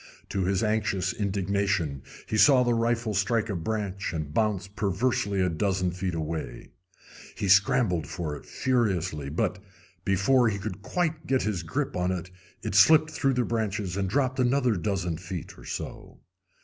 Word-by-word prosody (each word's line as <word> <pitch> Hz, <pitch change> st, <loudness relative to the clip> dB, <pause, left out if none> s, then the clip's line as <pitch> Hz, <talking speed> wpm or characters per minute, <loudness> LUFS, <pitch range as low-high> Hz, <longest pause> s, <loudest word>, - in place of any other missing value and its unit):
To 95 Hz, -2 st, -1 dB
his 95 Hz, +2 st, +1 dB
anxious 105 Hz, -4 st, 0 dB
indignation 100 Hz, -7 st, -1 dB, 0.2 s
he -, -, -3 dB
saw 130 Hz, +3 st, +6 dB
the 120 Hz, -1 st, +2 dB
rifle 115 Hz, -1 st, 0 dB
strike 110 Hz, +3 st, +1 dB
a -, -, -2 dB
branch 100 Hz, +1 st, -3 dB
and 75 Hz, -2 st, -4 dB
bounce 105 Hz, -3 st, 0 dB
perversely 100 Hz, 0 st, 0 dB
a 90 Hz, -, +3 dB
dozen 90 Hz, +1 st, 0 dB
feet 90 Hz, 0 st, -3 dB
away. 75 Hz, -6 st, -5 dB, 0.6 s
He 100 Hz, -, -2 dB
scrambled 95 Hz, -3 st, +3 dB
for 80 Hz, -4 st, -4 dB
it -, -, -10 dB
furiously; 95 Hz, -, 0 dB
but, 75 Hz, -, -1 dB, 0.4 s
before 110 Hz, +6 st, +3 dB
he 100 Hz, -, -2 dB
could 100 Hz, -1 st, -6 dB
quite 160 Hz, -, -2 dB
get 130 Hz, -1 st, +2 dB
his 105 Hz, -5 st, -1 dB
grip 130 Hz, -, -2 dB
upon 90 Hz, 0 st, -1 dB
it, 90 Hz, -1 st, -4 dB, 0.3 s
it -, -, -3 dB
slipped 155 Hz, +10 st, +6 dB
through 135 Hz, -3 st, +1 dB
the 125 Hz, -1 st, +1 dB
branches 105 Hz, -5 st, -2 dB
and 95 Hz, -1 st, -1 dB
dropped 130 Hz, +3 st, 0 dB
another 125 Hz, -2 st, +2 dB
dozen 90 Hz, -3 st, -1 dB
feet 90 Hz, -1 st, -7 dB
or -, -, -14 dB
so. -, -, -7 dB
100 Hz, 160 wpm, -27 LUFS, 90-115 Hz, 0.6 s, saw